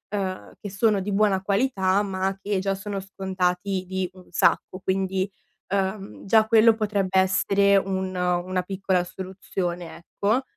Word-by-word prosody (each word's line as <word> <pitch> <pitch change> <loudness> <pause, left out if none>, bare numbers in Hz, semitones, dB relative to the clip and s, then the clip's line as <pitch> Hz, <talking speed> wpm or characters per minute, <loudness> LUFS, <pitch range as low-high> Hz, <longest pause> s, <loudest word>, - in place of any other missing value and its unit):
uhm, 190 -2 -3
che 205 - -5
sono 205 +1 +2
di 200 +2 -3
buona 200 -1 +2
qualità, 200 -1 +1
ma 190 -1 -2
che 200 0 -1
già 195 +1 0
sono 195 +1 -4
scontati 190 -1 -2
di 190 0 -2
un 185 -1 -16
sacco. 185 +1 +1
Quindi, 190 0 -1 0.5
uhm, 195 +1 -2
già 220 +2 +5
quello 225 0 +6
potrebbe 200 -3 0
essere 195 +1 +4
un 190 -1 -1
una 180 +1 0
piccola 190 -1 0
soluzione, 180 -2 -5
ecco. 210 +8 -1
190 Hz, 140 wpm, -25 LUFS, 185-200 Hz, 0.5 s, quello